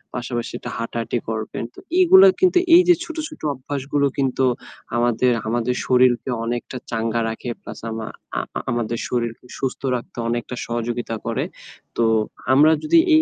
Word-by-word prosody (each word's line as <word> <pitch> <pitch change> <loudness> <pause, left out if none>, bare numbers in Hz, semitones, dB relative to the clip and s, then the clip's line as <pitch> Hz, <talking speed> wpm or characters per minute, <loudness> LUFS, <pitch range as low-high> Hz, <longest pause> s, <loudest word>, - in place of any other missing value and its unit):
পাশাপাশি 120 -1 -3
এটা - - -7
হাঁটাহাঁটি 115 +1 -2
করবেন। 110 0 -3
তো - - -13 0.2
এগুলা 380 +2 +8
কিন্তু 370 -1 +4 0.2
এই 355 - +9
যে 355 - +8
ছোট, 330 -2 -7
ছোট 305 - -13
অভ্যাসগুলো 140 +2 -2
কিন্তু 135 -1 +1 0.5
আমাদের, 120 +1 +2 0.2
আমাদের 120 +2 0
শরীরকে 125 0 +3 0.2
অনেকটা 120 +2 -3
চাঙ্গা 115 0 0
রাখে 115 +2 -5
প্লাস - - -9
আমা 110 0 -4 0.3
আ - - +1 0.2
আ - - -1
আমাদের 120 -1 -1
শরীরকে 120 -1 -2
সুস্থ 135 -1 -3
রাখতে 120 - -7
অনেকটা 120 +1 -3
সহযোগিতা 120 0 -2
করে। - - -1 0.5
তো 120 - +3 0.5
আমরা 150 +4 +6
যদি 320 +2 +4 0.2
এই 315 - +6
120 Hz, 155 wpm, -22 LUFS, 115-135 Hz, 0.5 s, এই